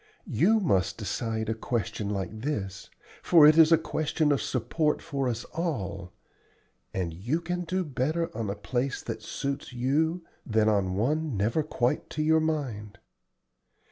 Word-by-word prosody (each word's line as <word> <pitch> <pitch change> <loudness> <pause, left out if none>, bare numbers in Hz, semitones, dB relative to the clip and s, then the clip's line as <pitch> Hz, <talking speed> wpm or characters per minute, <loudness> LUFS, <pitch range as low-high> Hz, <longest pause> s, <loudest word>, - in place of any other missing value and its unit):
You 210 - +4
must 95 - +1
decide 110 -2 -2
a 110 - +1
question 110 -2 -3
like 105 +2 -4
this, 105 -9 -4 0.3
for 165 -4 +7
it 155 +1 +8
is 160 0 +7
a 165 - +8
question 155 -1 0
of 140 - +2
support 145 +5 0
for 135 -2 -2
us 120 -1 -3
all, 100 - -3 0.8
and 90 -3 -2
you 120 - -1
can 175 +1 -3
do 185 +2 -1
better 155 +3 -1
on 110 -2 -2
a 100 - -2
place 125 +6 -2
that 110 -2 -5
suits 140 +3 -4
you 160 +8 0 0.2
than 110 -2 +2
on 100 -3 +2
one 145 +4 0
never 110 +10 +1
quite 130 -5 -1
to 155 - +1
your 160 +1 +4
mind. 125 -11 -3
130 Hz, 155 wpm, -28 LUFS, 110-155 Hz, 0.8 s, it